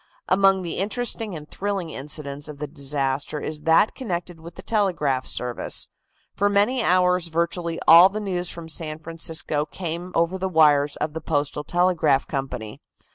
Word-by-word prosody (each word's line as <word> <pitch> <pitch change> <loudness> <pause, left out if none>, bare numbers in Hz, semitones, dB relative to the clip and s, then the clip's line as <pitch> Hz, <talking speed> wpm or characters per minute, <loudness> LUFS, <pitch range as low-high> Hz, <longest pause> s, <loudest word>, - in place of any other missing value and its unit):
Among 195 0 +4
the 170 - -3
interesting 215 -1 -2
and 150 -1 -8
thrilling 195 -3 -3
incidents 145 0 -4
of 150 -1 -9
the 150 - -4
disaster 140 -1 -2
is 150 0 -5
that 165 +6 +5
connected 175 -7 -5
with 170 +1 -11
the - - -10
telegraph 170 - 0
service. 125 -1 0 0.4
For 205 +1 +1
many 205 +6 +2
hours 180 -2 +2
virtually 170 0 -2
all 170 +3 +9
the 210 +2 -4
news 180 -4 -2
from 170 -1 -6
San 155 -1 -5
Francisco 160 -2 -2
came 170 +3 -5
over 170 +3 +1
the 190 +1 -1
wires 150 -4 +4
of 150 - -3
the 160 - -5
Postal 150 -1 -1
Telegraph 170 -5 +2
Company. 125 -6 -5
165 Hz, 160 wpm, -23 LUFS, 150-185 Hz, 0.4 s, all